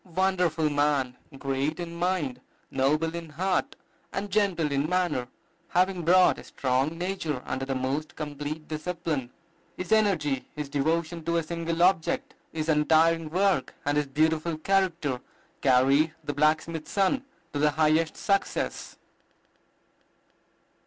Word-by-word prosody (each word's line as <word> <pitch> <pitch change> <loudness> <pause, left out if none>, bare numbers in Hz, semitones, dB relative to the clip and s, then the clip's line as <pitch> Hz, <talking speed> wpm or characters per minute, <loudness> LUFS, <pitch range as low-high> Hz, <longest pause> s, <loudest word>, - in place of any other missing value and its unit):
Wonderful 180 -5 +2
man! 145 -3 +1 0.2
great 135 +3 -1
in 170 -1 -5
mind, 170 -7 -1 0.3
noble 150 +5 +1
in 170 -1 -6
heart, 190 - -1 0.4
and 200 0 -4
gentle 185 -7 +1
in 140 +2 0
manner, 175 -9 0 0.4
having 185 0 +1
brought 180 +2 +5
a - - -10
strong 135 +5 -1
nature 170 -7 -3
under 135 0 -3
the 135 0 -2
most 140 +6 -2
complete 150 +1 -5
discipline. 155 -4 -3 0.5
His 180 -1 -5
energy, 175 -11 +2
his 150 -2 -4
devotion 160 +4 -1
to 170 0 +1
a 165 - +1
single 170 +1 -1
object, 180 -3 +2 0.2
his 155 -1 -3
untiring 160 +1 +3
work, 180 -5 +1
and 145 0 +1
his 150 -1 +1
beautiful 155 +3 +1
character 170 -7 0 0.4
carried 140 +4 +4
the 145 - -3
blacksmith's 155 +2 +1
son 200 +7 +1 0.3
to 145 - -2
the 150 +1 +4
highest 155 +1 +2
success. 200 -1 -1
160 Hz, 130 wpm, -27 LUFS, 145-175 Hz, 0.5 s, brought